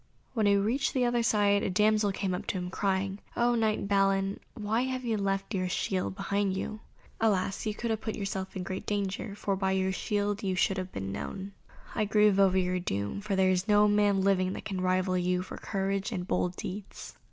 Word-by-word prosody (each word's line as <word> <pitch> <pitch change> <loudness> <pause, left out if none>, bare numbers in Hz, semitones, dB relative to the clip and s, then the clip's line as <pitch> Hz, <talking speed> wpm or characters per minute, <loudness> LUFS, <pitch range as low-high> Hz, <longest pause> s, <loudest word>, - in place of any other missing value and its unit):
When 220 -4 +2
he 200 - +5
reached 230 +9 +1
the 255 -1 +3
other 240 0 +2
side, 205 -3 +3
a - - -1
damsel 210 +2 +3
came 195 0 -2
to 180 +1 -3
him 180 0 -4
crying, 195 0 -1 0.2
"O 240 0 +3
knight 220 -3 +1
Balin, 195 -1 +2 0.2
why 220 +2 0
have 255 -1 -3
you 230 -2 +1
left 195 0 -1
your 185 -2 0
own - - -2
shield 185 0 -1
behind 200 -1 0
you? 215 +2 -4 0.4
Alas! 200 -1 +1
you 210 - -1
have 225 -2 -1
put 220 - -3
yourself 195 -2 -4
in 185 - -3
great 185 +1 -5
danger, 200 0 -2
for 200 -1 -1
by 190 0 0
your 190 0 +1
shield 205 +1 -1
you 190 -2 -1
should 190 +1 +2
have 185 0 -5
been 95 0 -4
known. 190 - -5 0.4
I 215 - +1
grieve 210 -1 +4
over 190 -1 +5
your 180 0 +1
doom, 100 - -3
for 205 -1 -1
there 190 0 +4
is 185 +2 0
no 210 0 +5
man 205 -1 +3
living 190 -1 +2
that - - -7
can 190 -3 -3
rival 185 0 +1
you 180 0 0
for - - -8
courage 195 +2 -2
and 180 -4 -3
bold 180 0 0
deeds." 195 +2 -7
195 Hz, 210 wpm, -29 LUFS, 185-210 Hz, 0.4 s, he